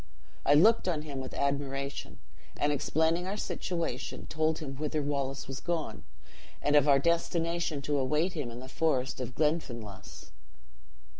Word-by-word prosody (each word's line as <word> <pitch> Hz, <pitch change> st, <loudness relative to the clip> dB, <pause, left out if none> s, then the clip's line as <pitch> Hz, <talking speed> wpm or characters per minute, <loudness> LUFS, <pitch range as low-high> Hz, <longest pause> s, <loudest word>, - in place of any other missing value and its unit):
I 145 Hz, -, +7 dB
looked 215 Hz, +7 st, +6 dB
on 160 Hz, -4 st, 0 dB
him 145 Hz, -3 st, -5 dB
with 130 Hz, -1 st, -6 dB
admiration; 140 Hz, 0 st, -2 dB, 0.4 s
and 145 Hz, -, +2 dB
explaining 160 Hz, +5 st, +1 dB
our 200 Hz, +2 st, -2 dB
situation, 170 Hz, -11 st, -3 dB
told 160 Hz, 0 st, +1 dB
him 135 Hz, -4 st, -6 dB
whither 155 Hz, +1 st, -1 dB
Wallace 140 Hz, -1 st, -2 dB
was 135 Hz, +1 st, -5 dB
gone, 170 Hz, -3 st, -3 dB, 0.6 s
and 145 Hz, 0 st, +2 dB
of 145 Hz, 0 st, +6 dB
our 140 Hz, -1 st, +7 dB
destination 170 Hz, -1 st, 0 dB
to 145 Hz, 0 st, +1 dB
await 150 Hz, +7 st, +1 dB
him 145 Hz, -7 st, -3 dB
in 120 Hz, +1 st, -8 dB
the 130 Hz, -, -8 dB
forest 130 Hz, -3 st, 0 dB
of 125 Hz, 0 st, -5 dB
Glenfinlass. 125 Hz, -, -2 dB
145 Hz, 150 wpm, -30 LUFS, 135-165 Hz, 0.6 s, I